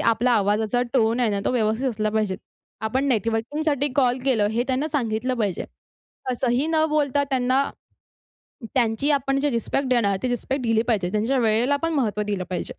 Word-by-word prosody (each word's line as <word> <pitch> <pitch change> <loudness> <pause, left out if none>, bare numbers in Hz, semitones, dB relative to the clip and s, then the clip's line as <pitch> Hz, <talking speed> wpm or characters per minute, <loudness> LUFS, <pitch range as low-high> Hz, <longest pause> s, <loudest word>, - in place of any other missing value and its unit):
आपला 230 +2 +2
आवाजाचा 215 +3 +1
टोन 230 -1 +2
आहे 235 - +2
ना 200 -1 -1
तो - - +1
व्यवस्थित 225 +2 +1
असला 215 -3 -1
पाहिजे. 210 -3 0 0.4
आपण 235 +6 -1
नेटवर्किंगसाठी 260 +6 0
कॉल 255 -2 +3
केलं 235 -6 +2
हे 235 +2 0
त्यांना 265 +4 0
सांगितलं 250 -1 -1
पाहिजे. 205 -5 -1 0.7
असंही 250 +3 0
न 315 -1 +2
बोलता 285 -2 +1
त्यांना 260 +1 +2 1.1
त्यांची 245 +2 +1
आपण 275 -1 +1
जे 290 - +1
रिस्पेक्ट 260 +3 -1
देणार 230 -6 +2
ते 255 - 0
रिस्पेक्ट 255 +2 -2
दिले 225 -1 +2
पाहिजे. 195 -6 +1
त्यांच्या 225 +6 +1
वेळेला 235 +4 +2
पण 330 - 0
महत्व 215 -7 0
दिलं 205 -3 -2
पाहिजे. 180 - -2
240 Hz, 170 wpm, -23 LUFS, 220-270 Hz, 1.1 s, कॉल